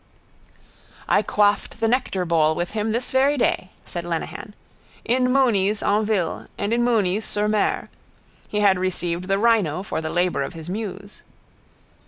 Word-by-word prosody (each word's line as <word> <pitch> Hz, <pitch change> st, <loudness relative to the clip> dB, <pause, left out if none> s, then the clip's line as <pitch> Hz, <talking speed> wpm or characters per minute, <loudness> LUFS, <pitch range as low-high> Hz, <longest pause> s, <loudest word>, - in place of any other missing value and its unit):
—I -, -, +4 dB
quaffed 205 Hz, +2 st, +1 dB
the 225 Hz, -, +1 dB
nectarbowl 175 Hz, -10 st, +1 dB
with 175 Hz, +1 st, -3 dB
him 220 Hz, 0 st, -1 dB
this 235 Hz, +3 st, -2 dB
very 275 Hz, +2 st, +3 dB
day, 185 Hz, -6 st, 0 dB, 0.2 s
said 175 Hz, -, -5 dB
Lenehan. 175 Hz, +4 st, -5 dB, 0.5 s
In 250 Hz, +1 st, +2 dB
Mooney's 215 Hz, -6 st, +2 dB
en 210 Hz, +2 st, +2 dB
ville 200 Hz, -6 st, -1 dB
and 205 Hz, +3 st, -1 dB
in 240 Hz, 0 st, +2 dB
Mooney's 215 Hz, -4 st, +1 dB
sur 210 Hz, 0 st, -1 dB
mer. 210 Hz, -1 st, 0 dB, 0.6 s
He 210 Hz, -, -1 dB
had 195 Hz, -2 st, +4 dB
received 180 Hz, -1 st, -2 dB
the 195 Hz, 0 st, +2 dB
rhino 200 Hz, -6 st, +2 dB
for 180 Hz, -, -3 dB
the 160 Hz, -, -4 dB
labour 175 Hz, -2 st, 0 dB
of 140 Hz, -, -4 dB
his 165 Hz, 0 st, -9 dB
muse. 200 Hz, -1 st, -6 dB
205 Hz, 155 wpm, -23 LUFS, 180-225 Hz, 0.6 s, I